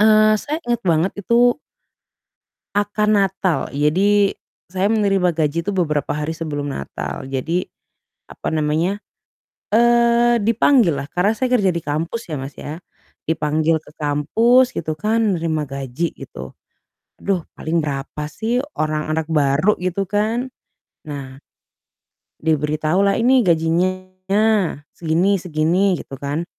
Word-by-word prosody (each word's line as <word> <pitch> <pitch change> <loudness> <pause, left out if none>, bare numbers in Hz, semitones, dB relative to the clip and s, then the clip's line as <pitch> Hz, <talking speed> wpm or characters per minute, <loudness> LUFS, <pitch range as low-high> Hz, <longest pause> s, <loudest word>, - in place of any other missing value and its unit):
eee, 215 0 +6
saya 300 +2 -3
inget 240 -1 0
banget 165 +2 +2
itu 240 +5 +3 1.2
akan 205 0 +2
Natal, 190 -2 0
jadi, 195 +8 +2 0.3
saya 190 +2 -1
menerima 195 -6 +2
gaji 160 0 +1
itu 195 +4 -3
beberapa 150 -5 0
hari 150 +1 -2
sebelum 145 -3 -4
Natal, 70 - -5
jadi, 160 +7 -2 0.6
apa - - -6
namanya, 160 +5 0 0.8
eee, 235 +1 +4
dipanggil 230 - +4
lah 140 - -5
karena 185 +4 +2
saya 255 +3 0
kerja 195 -4 +2
di 170 - -3
kampus 165 +10 -3
ya 155 - -3
Mas, 135 +1 -6
ya, 150 +2 -6 0.5
dipanggil 160 0 +1
ke 150 - -18
kampus 225 - +3
gitu 155 -1 -2
kan, 215 -1 +1
nerima 160 -2 -1
gaji 140 +3 -4
gitu, 65 +1 -9 0.7
duh, 190 -4 -1 0.2
paling 165 +2 0
berapa 145 +1 -4
sih, 235 +6 -1 0.2
orang 155 0 -1
anak 160 0 -1
baru 155 +5 +2
gitu 185 +2 -1
kan, 220 +6 0 0.6
nah, 140 -2 -8 1.0
diberitahu 155 +2 +1
lah, 200 - +2
"Ini 250 +3 +4
gajinya, 185 +4 +1 0.2
segini 175 +5 +1
segini," 180 +3 +1
gitu 135 - -9
kan, 145 +4 -2
175 Hz, 125 wpm, -20 LUFS, 155-210 Hz, 1.2 s, eee